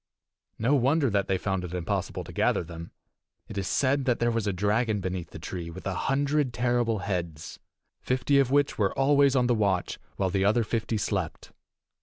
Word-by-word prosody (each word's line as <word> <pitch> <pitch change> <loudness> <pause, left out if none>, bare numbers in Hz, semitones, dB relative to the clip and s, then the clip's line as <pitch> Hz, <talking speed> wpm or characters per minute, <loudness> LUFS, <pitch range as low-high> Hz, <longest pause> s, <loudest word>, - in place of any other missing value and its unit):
No 120 +6 +1
wonder 140 0 +3
that 100 -1 +1
they 95 - +1
found 95 -1 -2
it 90 0 -5
impossible 90 -2 -2
to - - -11
gather - - +1
them! 85 0 -9 0.6
It - - -9
is 95 -2 -2
said 140 0 +1
that 125 -3 +2
there 120 0 +1
was 115 -2 -1
a - - +2
dragon 105 +3 +1
beneath 90 -3 -4
the - - -10
tree 85 +1 -6
with 90 +3 -10
a 95 - -1
hundred 140 +4 0
terrible 120 -2 +1
heads, 85 -5 -4 0.4
fifty 130 +2 +1
of 135 -3 +3
which 145 -2 +2
were 100 -2 +1
always 140 0 +4
on 125 -2 +3
the 120 - +3
watch 100 -5 0 0.2
while 95 -2 0
the 95 0 +1
other 110 +4 +3
fifty 110 0 -2
slept. 100 - -3
110 Hz, 195 wpm, -27 LUFS, 95-130 Hz, 0.6 s, always